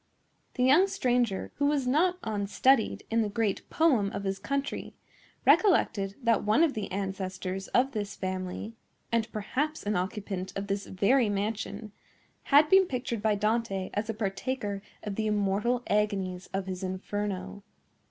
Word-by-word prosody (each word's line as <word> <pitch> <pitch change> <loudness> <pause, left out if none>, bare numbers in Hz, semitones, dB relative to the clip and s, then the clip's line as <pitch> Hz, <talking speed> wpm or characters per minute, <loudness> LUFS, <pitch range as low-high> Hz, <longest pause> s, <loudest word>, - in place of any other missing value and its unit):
The 250 - +1
young 300 +10 +6
stranger, 245 - 0
who 285 - +2
was 285 -3 +1
not 340 +8 +2
unstudied 220 +3 +2
in 230 0 +3
the 215 - 0
great 210 -1 -1
poem 255 -12 +3
of 200 - -4
his 195 0 -2
country, 280 0 -3 0.5
recollected 200 - +3
that 230 -1 +3
one 215 +10 +4
of 315 -4 +2
the 210 -3 -4
ancestors 190 0 -4
of 265 +2 +2
this 205 -4 -4
family, 185 +3 -4 0.4
and 230 -1 0
perhaps 285 +9 -2
an 210 0 -1
occupant 190 0 -3
of 195 - -3
this 200 0 -3
very 215 +5 +3
mansion, 205 +1 -3 0.5
had 290 +2 +6
been 380 +2 +6
pictured 245 -5 -3
by 215 -1 +2
Dante 210 -2 -1
as 210 +2 -2
a 225 - -2
partaker 205 0 -3 0.2
of 205 -2 -5
the 220 -1 0
immortal 210 +4 +1
agonies 195 -4 -1
of 195 0 -2
his 185 -1 -5
Inferno. 195 +1 -4
210 Hz, 150 wpm, -29 LUFS, 195-250 Hz, 0.5 s, young